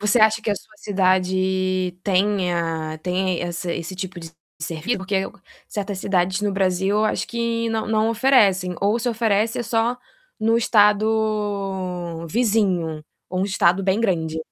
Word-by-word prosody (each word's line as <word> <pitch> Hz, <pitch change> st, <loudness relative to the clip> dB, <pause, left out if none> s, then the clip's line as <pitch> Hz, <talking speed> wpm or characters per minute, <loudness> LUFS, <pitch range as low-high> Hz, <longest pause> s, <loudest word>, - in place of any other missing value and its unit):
Você 210 Hz, +3 st, +3 dB
acha 220 Hz, 0 st, +4 dB
que 215 Hz, -, -1 dB
a 205 Hz, -, +2 dB
sua 215 Hz, +1 st, -13 dB
cidade 185 Hz, -1 st, +1 dB
tenha 175 Hz, -5 st, 0 dB
tenha 180 Hz, -1 st, -1 dB
esse 175 Hz, 0 st, -4 dB
esse 175 Hz, +3 st, -5 dB
tipo 185 Hz, -2 st, -5 dB
de 165 Hz, -1 st, -9 dB, 0.3 s
servi 165 Hz, +9 st, -2 dB
porque 190 Hz, +1 st, -4 dB
aí 190 Hz, -, +2 dB
eu -, -, -5 dB
gan 200 Hz, -, -22 dB, 0.3 s
certas 200 Hz, -2 st, -4 dB
cidades 185 Hz, +1 st, 0 dB
no 205 Hz, -1 st, 0 dB
Brasil, 195 Hz, +2 st, +1 dB
acho -, -, 0 dB
que 235 Hz, 0 st, -1 dB
não 220 Hz, 0 st, -1 dB
não 220 Hz, +1 st, +2 dB
oferecem, 205 Hz, -7 st, +3 dB
ou 205 Hz, +4 st, +2 dB
se 245 Hz, +1 st, -1 dB
oferecem 225 Hz, +1 st, +1 dB
é -, -, -1 dB
só 230 Hz, +1 st, 0 dB, 0.4 s
no 225 Hz, +1 st, +2 dB
estado 205 Hz, -6 st, +1 dB
vizinho, 190 Hz, -7 st, +1 dB, 0.3 s
ou 185 Hz, 0 st, -1 dB
um -, -, +2 dB
estado 190 Hz, -2 st, +2 dB
bem 195 Hz, +2 st, +1 dB
grande. 160 Hz, -7 st, 0 dB
195 Hz, 160 wpm, -22 LUFS, 180-215 Hz, 0.4 s, acha